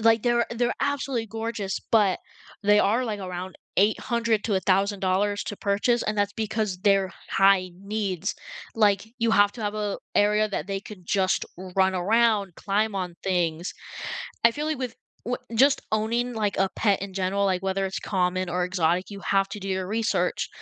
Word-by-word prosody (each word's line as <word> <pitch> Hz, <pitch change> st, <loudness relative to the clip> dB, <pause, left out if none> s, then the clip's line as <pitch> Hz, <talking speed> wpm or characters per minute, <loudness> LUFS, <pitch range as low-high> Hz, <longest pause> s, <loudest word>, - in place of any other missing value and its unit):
Like, 225 Hz, 0 st, +4 dB
they're 240 Hz, -1 st, +2 dB
they're 240 Hz, +1 st, 0 dB
absolutely 275 Hz, -4 st, -1 dB
gorgeous, 225 Hz, -3 st, -3 dB
but 205 Hz, -5 st, +3 dB, 0.4 s
they 205 Hz, 0 st, +5 dB
are 225 Hz, +5 st, +3 dB
like, 215 Hz, -3 st, -3 dB
around 185 Hz, 0 st, -6 dB, 0.2 s
$800 225 Hz, +2 st, +2 dB
to 215 Hz, -, 0 dB
$1,000 195 Hz, +1 st, +1 dB
to 205 Hz, -, -5 dB
purchase, 210 Hz, +5 st, +1 dB
and 215 Hz, -, -1 dB
that's 205 Hz, 0 st, +1 dB
because 215 Hz, -3 st, -2 dB
they're 195 Hz, -1 st, +2 dB, 0.2 s
high-needs, 195 Hz, 0 st, +1 dB, 0.4 s
like, 205 Hz, -2 st, +3 dB
you 230 Hz, 0 st, +2 dB
have 205 Hz, -1 st, +5 dB
to 240 Hz, -, -10 dB
have 205 Hz, 0 st, -2 dB
a 210 Hz, -1 st, -2 dB, 0.2 s
area 210 Hz, +1 st, +3 dB
that 190 Hz, -6 st, -3 dB
they 195 Hz, 0 st, -1 dB
can 200 Hz, -2 st, -11 dB
just 185 Hz, +1 st, +1 dB, 0.3 s
run 190 Hz, 0 st, +4 dB
around, 205 Hz, 0 st, +2 dB
climb 210 Hz, +3 st, 0 dB
on 180 Hz, -3 st, -3 dB
things. 175 Hz, -2 st, 0 dB, 0.7 s
I 230 Hz, -, +7 dB
feel 295 Hz, +6 st, -4 dB
like 310 Hz, -2 st, -1 dB
with 250 Hz, -3 st, -4 dB, 0.3 s
w 245 Hz, +2 st, -1 dB, 0.2 s
just 275 Hz, +4 st, +5 dB
owning 230 Hz, +3 st, 0 dB
like, 210 Hz, -3 st, -1 dB
a 195 Hz, 0 st, +2 dB
pet 200 Hz, -4 st, +2 dB
in 195 Hz, -1 st, -6 dB
general, 195 Hz, +1 st, 0 dB
like, 185 Hz, -1 st, 0 dB
whether 195 Hz, 0 st, 0 dB
it's 190 Hz, -, -4 dB
common 185 Hz, -1 st, 0 dB
or 180 Hz, +1 st, 0 dB
exotic, 180 Hz, 0 st, 0 dB
you 200 Hz, -1 st, -8 dB
have 195 Hz, 0 st, +1 dB
to 210 Hz, -, -6 dB
do 195 Hz, -, -6 dB
your 190 Hz, -1 st, -1 dB
research. 220 Hz, +2 st, 0 dB
200 Hz, 175 wpm, -26 LUFS, 190-220 Hz, 0.7 s, I